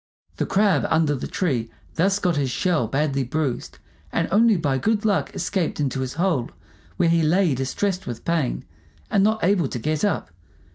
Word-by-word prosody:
The - - -1
Crab 200 0 +2
under 160 -2 +2
the 130 - -4
tree 125 - -1 0.2
thus 195 +4 +2
got 180 -4 0
his 140 -2 0
shell 155 -2 0
badly 140 +2 0
bruised, 140 -1 -3 0.3
and - - 0
only 220 +1 +5
by 140 -5 0
good 215 - 0
luck 205 -2 +1
escaped 185 -7 -1
into 135 -2 -1
his 130 -1 -3
hole, 165 -8 0 0.5
where 175 - +3
he 165 0 +3
lay 165 +1 +3
distressed 180 +9 -2
with 120 - -6
pain, 165 -6 -1 0.5
and 195 - +3
not 220 +1 +1
able 180 -4 +3
to 125 - -5
get 150 +5 -2
up. 200 - 0
165 Hz, 180 wpm, -23 LUFS, 135-195 Hz, 0.5 s, only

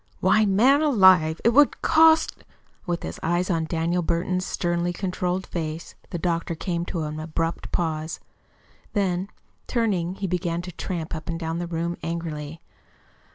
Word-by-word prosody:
"Why, 215 -1 +4
man, 250 +9 +4
alive, 190 - +5
it - - +7
would 285 +4 +4
cost 320 0 +4 0.2
" - - -35
With 175 -1 -2
his - - -6
eyes 175 +3 0
on 165 -2 0
Daniel 170 +2 0
Burton's 180 +2 -1
sternly 175 0 -1
controlled 180 0 -2
face, 160 -1 -5 0.2
the - - -3
doctor 170 0 -1
came 170 0 -2
to 170 -3 -3
an 150 0 -4
abrupt 165 +1 -3
pause. 160 -2 -2 0.7
Then, 190 -2 0 0.4
turning, 190 -7 0
he 195 - -4
began 175 -1 -2
to 180 - -7
tramp 170 -2 -5
up 160 +1 -6
and 165 0 -2
down 165 0 -3
the 175 - -3
room 170 +1 -2
angrily. 165 -2 -5
175 Hz, 155 wpm, -24 LUFS, 165-185 Hz, 0.7 s, it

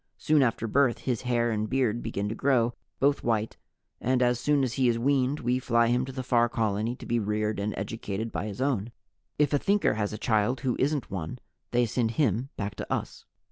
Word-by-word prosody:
Soon 155 -1 +3
after 115 -3 +1
birth 130 +1 +2
his 125 -3 -1
hair 120 -2 +1
and 110 0 -1
beard 120 -3 +1
begin 100 +1 -3
to 105 - -2
grow, 120 -1 +2 0.3
both 140 +1 +2
white, 110 -2 0 0.4
and 130 0 +2
as 120 -1 +2
soon 145 +2 +2
as 125 -3 -1
he 130 -1 +2
is 115 - +1
weaned 135 +3 +1
we 125 +1 +1
fly 115 -2 +2
him 125 +1 +2
to 135 - -7
the 130 0 -5
Far 120 -1 +3
Colony 110 +1 -1
to - - -11
be 120 0 +1
reared 105 0 -1
and 105 +1 -2
educated 110 +1 -4
by 105 - -3
his 100 +3 -6
own. 120 -5 0 0.5
If 150 -1 +2
a 145 - +3
Thinker 200 +5 +2
has 105 -1 -1
a 105 - -5
child 115 +2 +1
who 125 -2 0
isn't 145 0 0
one, 90 +2 -4 0.3
they 120 0 +2
send 115 +1 0
him 130 -3 +1
back 100 -1 -3
to - - -6
us. - - -3
120 Hz, 215 wpm, -28 LUFS, 110-130 Hz, 0.5 s, Soon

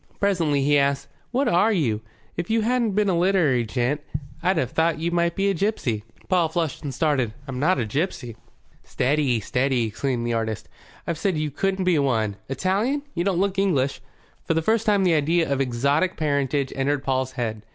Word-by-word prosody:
Presently 165 -8 +1
he 145 +1 +4
asked, 140 0 0 0.2
"What 265 +3 0
are 190 +6 +4
you? 125 - 0 0.3
If 175 0 -4
you 225 0 +2
hadn't 235 -1 +1
been 210 +1 +2
a 190 - +2
literary 170 -9 +3
gent 125 +6 -1 0.4
I'd 185 0 +2
have 130 -4 0
thought 160 +1 +1
you 165 +2 -2
might 170 0 +1
be 195 0 +1
a - - 0
gipsy." 160 - -1 0.2
Paul 175 -3 +2
flushed 160 -4 -2
and 145 - -4
started. 130 -5 0
"I'm 130 -2 -4
not 180 +7 +3
a 120 - 0
gipsy." 125 - -3 0.5
"Steady, 135 -3 +1
steady," 125 +2 +1
exclaimed 120 +2 -2
the 120 - 0
artist. 110 -2 -2 0.4
"I've 170 - -2
just - - -11
said 190 -5 +1
you 150 -1 -2
couldn't 190 +5 -1
be 175 -4 +3
one. 110 -7 0
Italian? 200 - 0
You 170 - -1
don't 190 -2 +1
look 195 0 0
English." 140 -10 +1 0.4
For 165 - 0
the 165 - +1
first 225 +4 +1
time 205 -2 +4
the 180 -2 +3
idea 160 +2 +2
of 140 -1 0
exotic 140 +8 +1
parentage 140 -2 0
entered 140 +1 0
Paul's 130 -1 -1
head. 110 -4 -3
150 Hz, 195 wpm, -24 LUFS, 130-185 Hz, 0.5 s, he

